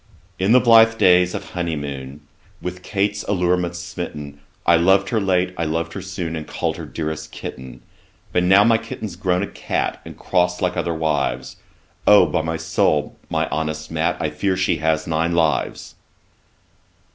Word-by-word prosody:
'In 95 +3 +2
the 125 - +7
blithe 115 -2 +6
days 90 -3 +4
of - - -7
honey 85 -2 -2
moon, 70 -1 -6 0.4
With 90 0 -6
Kate's 100 +2 -1
allurements 90 -2 0
smitten, 75 -5 -7 0.3
I 85 - +6
lov'd 95 +4 +3
her 110 -2 0
late, 90 -1 +1
I 85 - 0
lov'd 80 +2 -2
her 95 - -5
soon, 90 -3 -4
And 80 -1 -6
call'd - - -2
her - - -7
dearest 80 -1 -5
kitten. 65 -1 -8 0.5
But 90 - +3
now 95 +3 +6
my 115 0 +4
kitten's 110 -3 -7
grown 90 0 0
a - - -3
cat, - - -3
And - - -11
cross 90 -1 0
like 90 -2 0
other 85 -1 -1
wives, 70 -6 -1 0.5
O! 105 0 +8
by 85 - 0
my 80 +1 -3
soul, 75 -2 0
my - - 0
honest 80 0 -3
Mat, - - 0
I 75 - -1
fear 95 +5 -1
she - - +1
has 80 +1 0
nine 85 +1 0
lives.' 80 -3 0
85 Hz, 170 wpm, -21 LUFS, 80-95 Hz, 0.5 s, O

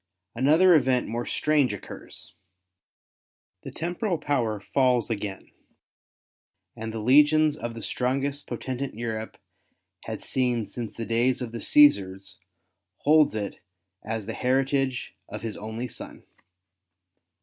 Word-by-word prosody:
Another 160 +7 +5
event 130 -5 +3
more 120 +2 -3
strange 150 -7 +2
occurs. 100 - -10 1.3
The - - -8
temporal 175 +3 -2
power 120 -9 -1
falls 125 +2 +1
again, 100 -3 -5 1.2
and 110 0 -5
the 115 - -5
legions 150 +6 +5
of 120 -5 -6
the 115 - -7
strongest 140 +3 -1
potentate 130 +2 -4
Europe 110 -1 -4 0.7
had - - -5
seen 125 -4 0
since 115 -1 -7
the 115 - -3
days 120 +3 +1
of 125 -3 -5
the 115 - -5
Ctesars 100 -9 +3 0.7
holds 150 -4 +5
it 105 -2 -4 0.4
as 110 -1 -4
the 115 - -4
heritage 130 0 0 0.2
of - - -7
his 115 -2 -4
only 110 +4 -5
son. - - -9
125 Hz, 120 wpm, -26 LUFS, 110-140 Hz, 1.3 s, Another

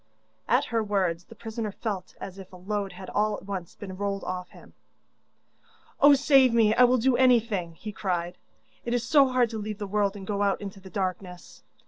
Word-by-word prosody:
At - - +3
her 230 -2 0
words 185 -5 -1
the - - -14
prisoner 225 -2 -5
felt 200 -2 -5
as 195 0 -8
if 190 - -11
a - - -12
load 195 +1 -3
had 185 +1 -10
all 210 0 +1
at - - -13
once 190 -3 -6
been 190 -2 -8
rolled 200 0 -3
off 180 0 -5
him. - - -17 1.3
'Oh, 285 0 +8
save 270 -3 +4
me, 220 -2 +5
and 250 - +3
I - - +9
will 250 +1 +3
do 250 +1 +2
anything!' 225 -9 +2
he 210 +5 -7
cried. 180 -3 -3 0.4
'It 240 0 -1
is 240 - 0
so 280 -1 +6
hard 255 -3 +1
to 220 - -4
leave 210 0 -5
the 205 - -4
world 200 0 0
and 195 -2 -8
go 205 0 -2
out 200 -1 +1
into 200 -1 -8
the 190 0 -12
darkness. 185 -2 -5
205 Hz, 210 wpm, -27 LUFS, 190-230 Hz, 1.3 s, I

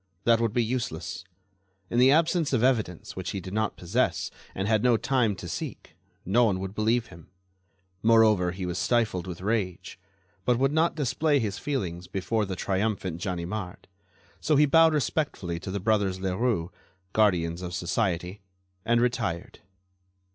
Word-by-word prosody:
That 115 -1 +4
would 115 -2 +1
be 120 +2 +1
useless. 90 -8 -3 0.7
In 120 - +2
the 130 +1 +7
absence 160 +1 +2
of 120 -2 +2
evidence 110 -10 0
which 95 -1 -4
he 100 - -2
did 95 +1 -8
not 110 0 -1
possess 105 +9 0 0.2
and 95 +1 -2
had 110 -1 +3
no 120 -1 +4
time 120 -5 +1
to 90 -1 -8
seek, - - -6 0.3
no 115 +7 +3
one 95 -4 +1
would 95 0 -5
believe 110 +3 +1
him. 80 -2 -14 0.7
Moreover, 110 -5 +4
he 95 +1 -5
was 90 0 -3
stifled 110 -7 0
with 90 -1 -7
rage, 100 -4 -2 0.4
but 125 +2 +2
would 135 +2 +2
not 160 +2 +2
display 145 +1 +1
his 105 -6 -2
feelings 90 - -3
before 105 +4 -1
the 95 - -3
triumphant 95 -3 -2
Ganimard. 90 0 -4 0.5
So 155 - +1
he 150 +1 +6
bowed 160 +2 +5
respectfully 115 - -1
to 95 - -7
the 100 +2 -2
brothers 100 -2 +1
Leroux, 95 -1 -1 0.4
guardians 90 -5 +2
of 90 -1 -5
society, 90 0 -1 0.4
and 120 +2 +2
retired. 115 -9 -2
105 Hz, 160 wpm, -27 LUFS, 90-120 Hz, 0.7 s, the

